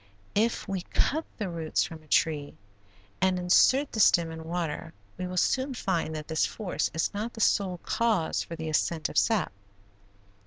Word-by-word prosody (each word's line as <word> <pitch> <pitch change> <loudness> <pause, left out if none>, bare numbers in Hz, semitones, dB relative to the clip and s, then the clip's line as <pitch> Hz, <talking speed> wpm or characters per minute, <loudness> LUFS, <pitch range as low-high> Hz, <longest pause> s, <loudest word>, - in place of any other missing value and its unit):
If 225 +3 +1
we 195 -2 -2
cut 310 - 0
the 210 - -2
roots 165 -3 -1
from 160 -2 -7
a 155 - -21
tree 150 -1 +1 0.7
and 190 0 +3
insert 255 +10 +4
the 220 - -4
stem 170 -5 +5
in 160 0 -8
water 165 -1 -4 0.2
we 180 0 -4
will 180 0 -5
soon 260 +7 +1
find 170 -7 -1
that 155 -1 -6
this 160 -1 +1
force 205 -5 -1
is 160 +6 -1
not 215 +3 -3
the - - -10
sole 190 -3 +2
cause 220 -8 +1
for 165 - -6
the 160 -1 -5
ascent 155 0 0
of - - -5
sap. 220 -4 +1
180 Hz, 180 wpm, -28 LUFS, 160-210 Hz, 0.7 s, stem